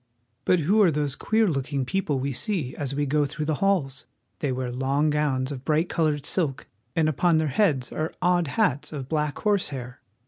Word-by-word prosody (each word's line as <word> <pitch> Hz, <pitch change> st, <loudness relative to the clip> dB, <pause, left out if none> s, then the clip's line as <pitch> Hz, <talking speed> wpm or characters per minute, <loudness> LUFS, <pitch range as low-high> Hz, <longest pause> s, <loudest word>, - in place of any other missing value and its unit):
But 180 Hz, -2 st, +3 dB
who 200 Hz, +8 st, +3 dB
are 190 Hz, -, +6 dB
those 145 Hz, -3 st, -1 dB
queer 220 Hz, +6 st, +2 dB
looking 135 Hz, -3 st, -1 dB
people 150 Hz, -2 st, -1 dB
we 140 Hz, +1 st, -2 dB
see 165 Hz, -, -2 dB
as 140 Hz, -3 st, -3 dB
we 145 Hz, 0 st, 0 dB
go 145 Hz, +2 st, +2 dB
through 150 Hz, +2 st, -4 dB
the 155 Hz, -, 0 dB
halls? 175 Hz, -9 st, 0 dB, 0.3 s
They 145 Hz, -5 st, -1 dB
wear 130 Hz, -1 st, -2 dB
long 135 Hz, +4 st, +1 dB
gowns 145 Hz, -3 st, 0 dB
of 135 Hz, -2 st, -6 dB
bright 155 Hz, +3 st, +1 dB
colored 150 Hz, -3 st, 0 dB
silk, 150 Hz, -7 st, -1 dB, 0.3 s
and 160 Hz, -2 st, +3 dB
upon 160 Hz, +2 st, +2 dB
their 155 Hz, -1 st, +1 dB
heads 140 Hz, -, +1 dB
are 155 Hz, +1 st, -2 dB
odd 175 Hz, -2 st, +2 dB
hats 130 Hz, +1 st, 0 dB
of 140 Hz, -4 st, -5 dB
black 150 Hz, -1 st, -1 dB
horsehair. 140 Hz, -, -2 dB
150 Hz, 195 wpm, -25 LUFS, 135-165 Hz, 0.3 s, are